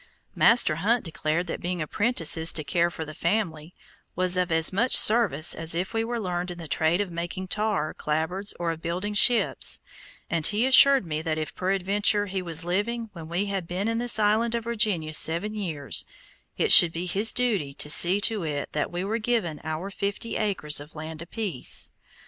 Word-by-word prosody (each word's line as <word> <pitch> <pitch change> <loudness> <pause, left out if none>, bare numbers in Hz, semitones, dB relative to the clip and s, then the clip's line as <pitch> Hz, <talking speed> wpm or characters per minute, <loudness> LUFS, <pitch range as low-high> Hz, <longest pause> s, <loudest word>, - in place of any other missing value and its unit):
Master 230 -10 +4
Hunt 225 +7 0
declared 160 +1 -2
that 165 - -6
being 180 0 -3
apprentices 165 -2 +1
to 155 - -2
care 170 +2 0
for 160 -2 -7
the 155 - -9
family, 170 -3 -3 0.4
was 185 0 +2
of 180 -1 -1
as 160 +2 +1
much 230 +7 +2
service 210 -9 +4
as 165 0 -2
if 180 +5 -3
we 225 0 0
were 235 +1 -4
learned 180 -3 -3
in 175 - -7
the 165 -2 -9
trade 160 +4 +1
of 200 -3 -4
making 175 +2 -5
tar, 210 -7 -1
clapboards, 160 +7 -3
or 170 -1 -1
of 160 -1 -8
building 180 +5 -3
ships, 235 +3 +3 0.5
and 165 -2 +1
he 215 +3 0
assured 265 -2 +6
me 155 -1 -4
that 160 -1 -3
if 155 -1 -5
peradventure 195 +2 0
he 190 -1 -4
was 165 -1 -4
living 220 +5 -2
when 165 -3 -10
we 175 +4 -1
had 195 -4 -4
been 185 +5 -3
in 230 0 -1
this 240 -1 +2
land 220 +2 +1
of 230 - -3
Virginia 210 -9 -1
seven 170 +7 +2
years, 165 -10 -2 0.5
it - - +1
should 170 - +10
be 170 +2 -5
his 200 +5 +2
duty 215 - -1
to 140 - -4
see 175 +6 +4
to 215 -1 0
it 150 -3 -4
that 150 - -3
we 175 +1 -4
were 220 +4 -2
given 215 -10 -2
our 160 +5 -5
fifty 200 +3 -4
acres 190 -9 -1
of 145 +2 -13
land 155 +1 -8
apiece. 180 - -3
180 Hz, 195 wpm, -25 LUFS, 160-210 Hz, 0.5 s, should